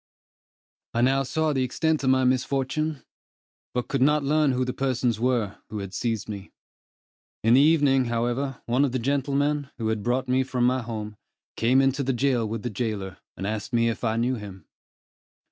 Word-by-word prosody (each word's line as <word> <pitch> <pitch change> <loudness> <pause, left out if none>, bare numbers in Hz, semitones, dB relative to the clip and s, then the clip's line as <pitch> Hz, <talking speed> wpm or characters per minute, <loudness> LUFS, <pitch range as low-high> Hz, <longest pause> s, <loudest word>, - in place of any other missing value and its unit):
I 120 - +2
now 135 +2 +3
saw 155 +3 0
the 135 - 0
extent 155 +4 0
of 130 - +2
my 130 0 +4
misfortune, 135 +3 0 0.7
but 125 - -1
could 135 - -1
not 150 +2 +4
learn 150 0 +3
who 130 0 0
the 125 - -3
persons 125 -4 0
were, 120 -5 0
who 110 - -5
had 100 -1 -6
seized 115 -4 -2
me. 100 -2 -7 0.9
In 115 +2 +5
the 130 - +7
evening, 145 -4 +4
however, 120 +3 -2
one 125 +4 +2
of 135 -3 0
the - - +1
gentlemen, 140 +2 0
who 110 -2 -1
had 110 -1 -1
brought 125 +4 0
me 130 +1 +2
from 125 -2 +1
home, 115 -4 -4 0.4
came 125 +4 +3
into 135 +1 +1
the 135 0 0
jail 120 -3 +1
with 115 -1 -4
the 120 - -3
jailer, 105 -4 -3 0.2
and 95 - -4
asked 110 +5 -4
me 115 0 +3
if 115 - -4
I 110 -1 +1
knew 125 +2 +1
him. 95 -5 -10
125 Hz, 185 wpm, -25 LUFS, 115-135 Hz, 0.9 s, the